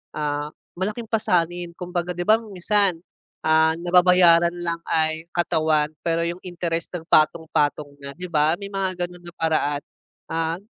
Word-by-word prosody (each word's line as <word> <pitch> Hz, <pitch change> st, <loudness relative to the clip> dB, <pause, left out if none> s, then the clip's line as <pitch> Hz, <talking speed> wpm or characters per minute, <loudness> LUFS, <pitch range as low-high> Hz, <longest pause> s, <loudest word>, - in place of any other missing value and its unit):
ah, 150 Hz, 0 st, -2 dB, 0.3 s
malaking 210 Hz, +5 st, -3 dB
pasanin 175 Hz, -5 st, 0 dB
kumbaga 180 Hz, 0 st, -3 dB
di 175 Hz, -, -2 dB
ba, 215 Hz, -, +7 dB
minsan, 200 Hz, -3 st, 0 dB, 0.5 s
ah, 160 Hz, 0 st, +4 dB
nababayaran 175 Hz, -1 st, +5 dB
lang 170 Hz, -1 st, -2 dB
ay 160 Hz, 0 st, +1 dB
katawan 160 Hz, -3 st, +2 dB, 0.2 s
pero 165 Hz, 0 st, 0 dB
'yung 175 Hz, +1 st, -4 dB
interest 170 Hz, -2 st, -3 dB
nag 165 Hz, -1 st, -7 dB
patong-patong 155 Hz, -2 st, +2 dB
na 140 Hz, -, -6 dB
di 180 Hz, +1 st, -3 dB
ba, 155 Hz, +1 st, +3 dB
may 200 Hz, -, -5 dB
mga 185 Hz, -2 st, -1 dB
gano'n 175 Hz, 0 st, -15 dB
na 175 Hz, -, -10 dB
paraan. 150 Hz, -3 st, 0 dB, 0.5 s
Ah, 165 Hz, +1 st, -1 dB
170 Hz, 145 wpm, -23 LUFS, 160-180 Hz, 0.5 s, ba